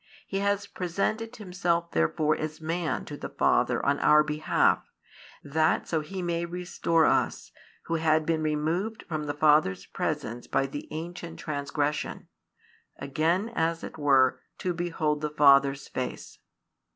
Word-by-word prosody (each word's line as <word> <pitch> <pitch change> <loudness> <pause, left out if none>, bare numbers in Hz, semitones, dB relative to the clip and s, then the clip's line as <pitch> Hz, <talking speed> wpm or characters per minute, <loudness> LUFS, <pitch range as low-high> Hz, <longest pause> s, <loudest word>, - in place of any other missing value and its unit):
He 195 - -3
has 200 0 0
presented 200 +5 -2
Himself 180 -4 -1
therefore 150 - +1
as 155 0 -5
Man 165 +1 -2
to 145 - -7
the - - -6
Father - - +2
on 140 0 +2
our 150 0 +6
behalf, 150 +1 +1 0.5
that 155 +3 +1
so 160 - 0
He 185 +4 -6
may 170 -1 -1
restore 170 -2 0
us, - - +1 0.3
who 165 - -1
had 155 -1 +2
been 160 -1 0
removed 160 +8 -1
from 155 -2 -3
the 145 - -2
Father's 150 -12 +3
presence 120 +2 -3
by 135 - +1
the 135 +2 -6
ancient 170 +1 -6
transgression, 145 0 -3 0.7
again 165 +9 0
as 165 -7 -1
it - - -8
were 135 -3 +4 0.2
to 180 - -2
behold 160 -3 -1
the 150 - -1
Father's 140 -2 +4
face. 130 -1 -5
155 Hz, 140 wpm, -27 LUFS, 150-175 Hz, 0.7 s, our